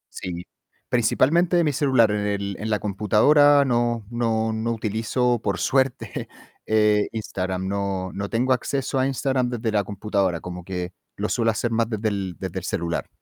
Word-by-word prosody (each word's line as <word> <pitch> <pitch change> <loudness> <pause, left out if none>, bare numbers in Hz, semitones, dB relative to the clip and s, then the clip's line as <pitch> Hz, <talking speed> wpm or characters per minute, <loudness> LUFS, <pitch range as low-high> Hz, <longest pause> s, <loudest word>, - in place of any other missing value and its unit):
Sí, 90 -1 -5 0.4
principalmente 170 +9 +3
mi 150 -3 +1
celular, 130 -7 +3
en 105 0 -1
el 100 -1 -2
en 110 +1 -3
la 105 - +2
computadora 140 +9 +4
no 120 -3 0
no 115 -2 0
no 110 +1 -1
utilizo, 115 +2 0
por 100 -2 0
suerte, 130 -5 0 0.4
eh, 105 -1 +3
Instagram, 95 -4 -3
no 100 -1 -2
no 100 0 -4
tengo 125 +3 +2
acceso 135 +2 -1
a 130 - +2
Instagram 130 -2 0
desde 115 -2 -2
la 105 -1 +1
computadora, 100 -4 -1
como 90 0 -7
que 90 0 -4 0.2
lo 105 +2 -2
suelo 115 -2 +1
hacer 115 +2 -1
más 115 0 +1
desde 110 -1 -1
el 95 -3 -3
desde - - -4
el - - -13
celular. 85 0 -2
110 Hz, 170 wpm, -23 LUFS, 100-125 Hz, 0.4 s, computadora